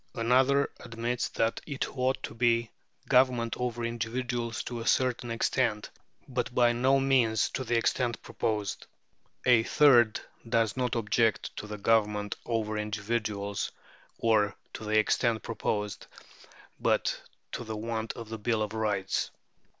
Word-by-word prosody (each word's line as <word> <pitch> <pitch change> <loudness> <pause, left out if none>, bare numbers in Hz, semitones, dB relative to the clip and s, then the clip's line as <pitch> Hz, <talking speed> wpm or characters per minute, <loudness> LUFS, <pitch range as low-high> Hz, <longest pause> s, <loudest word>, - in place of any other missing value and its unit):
Another 130 +4 +3
admits 115 +1 -3
that 115 0 0
it 140 -2 -4
ought 130 0 0
to - - -5
be 115 0 +2 0.3
a - - -29
government 125 -3 +3
over 120 -1 -2
individuals 115 0 -2
to 120 -1 -5
a 115 - -5
certain 125 -2 +1
extent, 115 -2 0 0.4
but 125 -2 -3
by 120 -1 +5
no 130 +3 +3
means 130 -5 +2
to 130 - -3
the 120 -1 +1
extent 120 0 0
proposed. 105 -3 -2 0.6
A 125 -3 +6
third 120 -3 +5 0.3
does 115 -2 +2
not 125 -2 -1
object 115 0 +1
to 105 - -5
the 105 0 -6
government 105 -1 +1
over 110 -2 -1
individuals, 105 -1 -2 0.5
or 110 -3 +2 0.2
to 110 - -7
the 110 0 +2
extent 110 +1 +2
proposed, 105 -2 -3 0.7
but - - +1 0.3
to - - -4
the 110 -1 -5
want 110 0 -3
of 115 -1 -9
a 110 - -5
bill 110 0 0
of 105 0 -5
rights. 105 -3 -1
115 Hz, 140 wpm, -29 LUFS, 110-125 Hz, 0.7 s, A